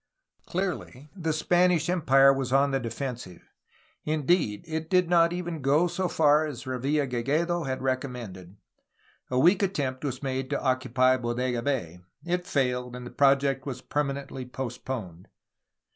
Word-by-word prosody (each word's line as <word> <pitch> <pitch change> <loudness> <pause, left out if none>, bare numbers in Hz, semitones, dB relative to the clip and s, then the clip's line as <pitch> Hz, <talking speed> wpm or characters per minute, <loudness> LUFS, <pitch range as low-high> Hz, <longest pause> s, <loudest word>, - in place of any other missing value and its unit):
Clearly, 170 -6 -4
the 165 -4 -2
Spanish 175 +1 +2
Empire 135 -6 +5
was 135 -2 -3
on 140 +1 +3
the 135 - +1
defensive. 120 -6 -6 0.6
In 155 -2 -2
deed, 150 - +1
it 160 0 -4
did 180 -2 +3
not 170 -1 +5
even 175 -3 -4
go 145 +6 +3
so 180 +2 -1
far 155 -1 +3
as 125 -5 -7
Revilla 135 +3 0
Gigedo 150 +8 0
had 130 0 -3
recom 130 0 -1
mended. 95 -5 -9 0.7
A 125 - -1
weak 175 +9 +5
attempt 145 -10 -1
was 135 -1 -4
made 130 -1 -2
to 145 - -1
occupy 130 -1 +2
Bodega 120 0 -2
Bay. 115 - -2 0.3
It 180 +1 -2
failed, 125 -3 -1
and 125 0 -8
the 120 - -8
project 135 -1 +2
was 130 -2 -5
permanently 140 -2 -3
postponed. 120 -8 -6
135 Hz, 150 wpm, -27 LUFS, 125-155 Hz, 0.7 s, Empire